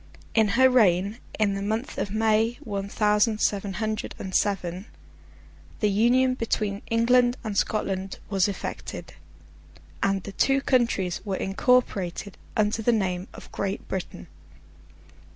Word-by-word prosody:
In 220 -2 +4
her 260 0 +7
reign, 205 -3 +3 0.2
in 210 -2 +2
the 195 - -3
month 220 +6 -3
of - - -2
May, 220 +2 +2
one 200 -5 -4
thousand 210 +1 +2
seven 200 -2 0
hundred 215 +1 -3
and 190 - -7
seven, 190 0 -1 0.9
the 210 -2 +2
Union 245 +5 +3
between 215 -4 -2
England 245 +2 +3
and 215 -3 -4
Scotland 195 -2 -1
was 195 -2 +2
effected, 200 - -6 0.9
and 195 -1 +1
the 200 - -7
two 270 +7 +2
countries 235 -10 +1
were 195 -3 -2
incorporated 195 -3 0 0.2
under 215 +1 +1
the 240 - +3
name 185 -4 -1
of - - -12
Great 195 0 -3
Britain. 190 -2 -5
210 Hz, 135 wpm, -26 LUFS, 195-230 Hz, 0.9 s, her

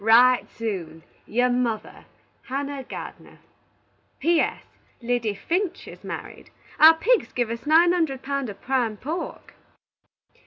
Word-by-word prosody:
Wright 245 +3 +5
soon. 180 -8 -5 0.2
"Your 245 +3 +2
mother, 240 -3 -2 0.4
HANNAH 275 0 -3
GARDENER" - - -9 0.8
"P. 335 +3 +3
S. - - -1 0.4
Liddy 235 -3 -1
Finch 360 - -2
is - - -12
married. - - -8 0.3
Our 320 +1 +9
pigs 460 +8 +2
give 240 -2 -1
us 230 +5 -6
nine 330 +3 +6
hunderd 310 -7 -1
pound 275 -2 -2
of 200 - -9
prime 245 -5 0
pork." 320 - -6
255 Hz, 125 wpm, -24 LUFS, 230-315 Hz, 0.8 s, Our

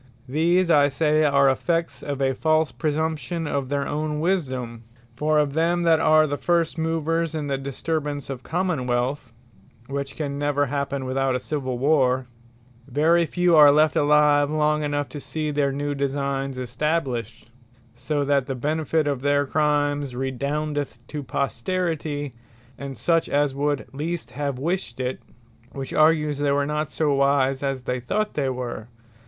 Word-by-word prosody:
These 170 +6 +2
I 145 -2 +6
say 155 +2 +2
are 140 -1 +4
effects 165 +5 0
of 140 -1 -3
a 135 0 +2
false 155 +1 +1
presumption 160 +2 -2
of 140 -3 -2
their 140 -1 -1
own 150 0 -2
Wisdome. 130 -10 -2 0.3
For 155 +4 +1
of 145 -2 +2
them 170 +2 +1
that 165 -2 +4
are 155 0 +5
the 145 -1 -3
first 170 -2 +1
movers 165 0 -1
in 155 -2 -2
the 140 -1 -1
disturbance 145 +1 -3
of 135 -2 -6
Common 170 -5 -1
wealth, 125 +1 -1 0.5
(which 140 +1 -5
can 140 -2 -4
never 145 0 +1
happen 140 0 -3
without 130 0 0
a - - 0
Civill 130 -2 -3
Warre,) 130 -2 +2 0.6
very 160 +5 +3
few 175 0 +2
are 150 -2 +9
left 155 +1 +3
alive 145 -1 +4
long 150 0 +1
enough, 145 -1 -1
to 145 - -7
see 155 +1 -3
their 145 -1 +1
new 145 +1 -2
Designes 140 -1 -2
established: 125 -3 -3 0.4
so 140 +4 -2
that 140 -2 +1
the 135 - -3
benefit 155 +3 0
of 140 -3 -1
their 145 0 +2
Crimes, 145 -2 0
redoundeth 140 +2 -2
to 150 -1 -4
Posterity, 145 0 -2 0.4
and 140 -2 -7
such 165 +8 +1
as 145 -1 +1
would 145 0 -1
least 150 -3 -4
have 140 0 -3
wished 160 -4 -3
it: 130 0 -3 0.5
which 135 -1 -6
argues 155 -2 +3
they 145 -1 +1
were 140 0 +1
not 150 +1 -1
as - - -14
wise, 140 -1 +2
as 135 -2 -2
they 125 -1 -2
thought 210 - -2
they 140 -3 0
were. 125 -3 -5
145 Hz, 160 wpm, -24 LUFS, 135-155 Hz, 0.6 s, are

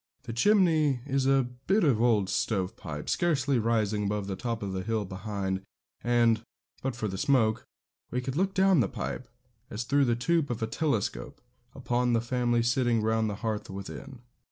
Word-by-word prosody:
The 115 - -6
chimney 155 - +3
is 135 -1 0
a 135 -2 +3 0.2
bit 205 +3 +3
of 130 -8 +3
old 110 -5 +3
stove 95 0 -1
pipe, 75 -7 -7
scarcely 140 -7 +1
rising 110 -2 +1
above 105 0 -1
the 95 -1 -3
top 115 0 -3
of 95 -1 -3
the 95 - -2
hill 110 +1 -1
behind; 95 0 -3 0.4
and, 120 -2 +3 0.4
but 135 -2 -2
for 110 -3 -2
the 95 -1 -4
smoke, 115 -5 +2 0.4
we 125 - -1
could 130 +1 -4
look 190 +4 0
down 190 -3 +4
the 125 - +2
pipe, 130 - -5 0.4
as 105 +3 -4
through 140 +3 +2
the 120 -2 +2
tube 155 +5 +1
of 115 -2 -3
a - - +3
telescope, 115 -3 -2 0.4
upon 125 -2 0
the 115 - +3
family 120 -1 +1
sitting 120 -2 +2
round 110 0 +1
the 105 - -3
hearth 110 -2 -2
within. 115 +7 -8
120 Hz, 180 wpm, -28 LUFS, 105-135 Hz, 0.4 s, down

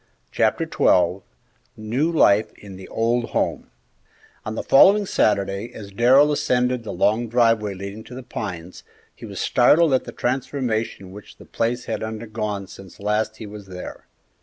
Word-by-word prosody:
Chapter - - +1
XII 90 +1 +2 0.6
NEW 120 +10 -1
LIFE 110 -10 +3
IN 100 -2 -12
THE 95 0 -11
OLD 115 +1 0
HOME - - -2 0.7
On 110 - -5
the - - -3
following 200 +8 +6
Saturday, 100 - 0
as 100 -2 -9
Darrell 130 +8 +5
ascended 125 -3 0
the 110 - -6
long 110 +6 +1
driveway 115 -3 +2
leading 100 +3 -8
to 125 - -11
The 130 - -8
Pines, 90 -7 -7 0.3
he - - -10
was - - -7
startled 160 -2 +4
at 130 - +1
the - - -7
transformation 120 -6 -3
which 105 +1 -13
the - - -14
place 120 +2 -2
had - - -4
undergone 110 -2 -4
since 95 -1 -14
last 105 +2 -1
he 110 - -8
was 105 -1 -10
there. 90 -1 -9
110 Hz, 160 wpm, -22 LUFS, 100-125 Hz, 0.7 s, following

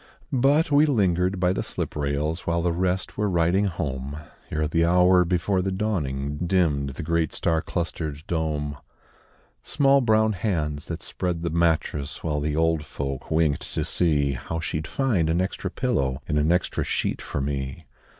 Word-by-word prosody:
But 140 +5 +3
we 145 +2 +5
lingered 95 - +1
by 90 0 +2
the - - -1
slip - - -4
rails 75 +3 -2
While 85 0 +1
the 85 -1 +1
rest 90 +2 -1
were 105 -1 +1
riding 90 +3 +2
home, 70 -6 -3 0.3
Ere 75 0 0
the 80 +2 +2
hour 90 +1 +5
before 90 +2 +1
the 95 +1 -1
dawning, 75 -9 -2
Dimmed 80 -7 +2
the - - -5
great 85 -1 0
star 80 -1 +1
clustered 80 -4 -4
dome. 75 -3 -2 0.8
Small 140 -2 +3
brown 110 -2 +3
hands 80 -7 -2
that 85 0 -5
spread 90 -2 -3
the 85 - -1
mattress 80 -3 0
While 75 -2 0
the 75 0 -1
old 80 -1 +2
folk 70 -2 -5
winked 80 -3 +1
to - - 0
see 75 -5 +1
How 70 +5 -4
she'd 80 -1 -3
find 105 -12 +1
an 85 +2 +2
extra 95 0 -2
pillow 70 - -1
And 75 - +1
an 75 +3 +2
extra 90 +1 +1
sheet - - -1
for - - -4
me. 70 +2 -3
85 Hz, 170 wpm, -25 LUFS, 75-95 Hz, 0.8 s, we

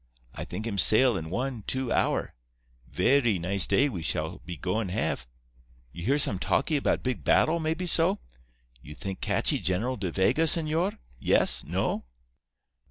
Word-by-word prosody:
I - - -6
think 105 +5 -6
him 100 -4 -2
sail 115 +6 +5
in 80 -3 -5
one, 125 +3 -3
two 130 -2 -2
hour. - - 0 0.6
Verree 120 - +2
nice 95 +2 +2
day 140 - +3
we 100 - -5
shall 75 - -2
be 85 0 -8
goin' 95 +6 -2
have. 65 -7 -2 0.6
You 85 - -8
hear 135 +9 +2
some 100 -10 +1
talkee 145 - +1
'bout - - 0
big 130 -1 -3
battle, 165 +2 +3
maybe 160 +3 -2
so? 175 +3 +2 0.6
You 75 +4 -11
think 95 +2 -6
catchee - - +2
General 110 +8 -1
De 95 -3 -3
Vega, 95 - +2
señor? 165 +6 +2 0.2
Yes? - - +2
No? - - -2
115 Hz, 160 wpm, -27 LUFS, 95-145 Hz, 0.6 s, sail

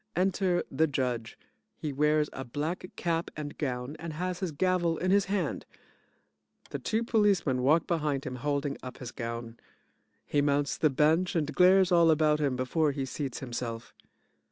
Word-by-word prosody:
Enter 185 -1 +1
the 160 - +2
JUDGE. 125 -5 -2 0.4
He 150 -2 -4
wears 150 +2 +2
a 135 - -5
black 155 +8 -4
cap 170 -1 -1
and 145 -1 -5
gown 125 0 -3
and 165 0 -6
has 180 +2 -3
his 185 -4 -2
gavel 175 +1 +1
in 185 +1 0
his 200 0 +4
hand. 200 0 -1 1.1
The - - -3
two 225 +1 -1
POLICEMEN 200 - +2
walk 155 +6 +3
behind 150 -5 -1
him 125 -1 -4
holding 140 +1 -2
up 130 0 -8
his 125 -2 -7
gown. 115 -1 -6 0.7
He 145 - +1
mounts 145 0 +1
the 155 - +3
bench 160 +7 +2
and 150 -3 0
glares 185 +1 +5
all 170 -2 +5
about 155 -1 +3
him 140 -4 +1
before 145 +4 +1
he 135 -1 -2
seats 135 -1 -5
himself. 120 -2 -5
150 Hz, 165 wpm, -29 LUFS, 135-175 Hz, 1.1 s, glares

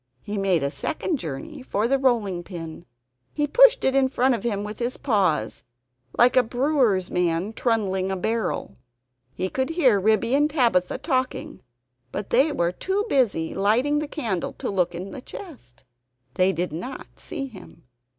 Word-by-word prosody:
He 205 - -5
made 190 -6 +1
a 140 - -1
second 310 - -2
journey 210 - -7
for 225 -3 -1
the 270 +2 +2
rolling 220 -9 +1
pin. 170 -2 -8 0.5
He 295 - +1
pushed - - +6
it 265 0 +2
in 270 -1 +4
front 260 0 +2
of 235 - -2
him 205 -4 -2
with 210 0 -7
his 240 +1 -2
paws, 185 - 0 0.5
like 245 +1 +5
a 255 - +7
brewer's 245 -6 +1
man 180 +3 0
trundling 195 -6 0
a 190 - -1
barrel. 220 - -2 0.6
He 185 - -1
could 260 +8 -2
hear 275 - +3
Ribby 220 +4 +2
and 295 +2 +3
Tabitha 235 - +2
talking, 255 -1 -2 0.5
but 205 - -5
they 275 +6 +4
were 170 -10 0
too 385 - -1
busy 220 - +1
lighting 245 +9 +2
the 300 - -3
candle 225 - -3
to - - -4
look 180 -3 0
into 185 +3 -6
the 270 - -8
chest. 250 - -11 0.5
They 185 +1 +3
did 175 -2 -3
not 185 +12 -7
see 280 -5 -5
him. 230 -8 -13
220 Hz, 170 wpm, -24 LUFS, 185-265 Hz, 0.6 s, a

